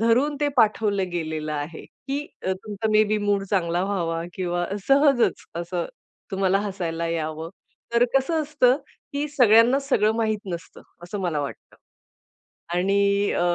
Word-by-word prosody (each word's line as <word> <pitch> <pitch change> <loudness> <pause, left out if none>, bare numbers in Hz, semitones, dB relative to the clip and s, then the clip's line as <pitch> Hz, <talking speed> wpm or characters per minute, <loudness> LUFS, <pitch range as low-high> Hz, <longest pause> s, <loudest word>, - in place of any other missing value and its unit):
धरून 250 +6 +3
ते 290 - +2
पाठवलं 210 -4 +2
गेलेलं 155 -3 -3
आहे 150 +2 -5
की 280 +2 -6 0.2
अ, 190 - 0
तुमचा 205 +3 -4
मे 215 0 +5
बी 215 0 0
मूड 205 -1 +1
चांगला 175 -3 +1
व्हावा 170 -4 -1
किंवा 175 -1 -1 0.2
सहजच 275 -3 +4 0.2
असं 175 0 -3 0.4
तुम्हाला 195 0 +2
हसायला 175 -5 -3
यावं. 160 -1 -3 0.5
तर 235 - +5
कसं 310 +4 +2
असतं, 280 -4 +3 0.4
की 285 +1 -1
सगळ्यांना 245 -2 +5
सगळं 260 -6 +2
माहीत 220 -2 +1
नसतं, 170 -1 -8 0.2
असं 185 +4 -5
मला 170 -5 -1
वाटतं. 140 - -7 1.0
आणि 200 +2 +2
अ, - - 0
200 Hz, 140 wpm, -24 LUFS, 175-235 Hz, 1.0 s, मे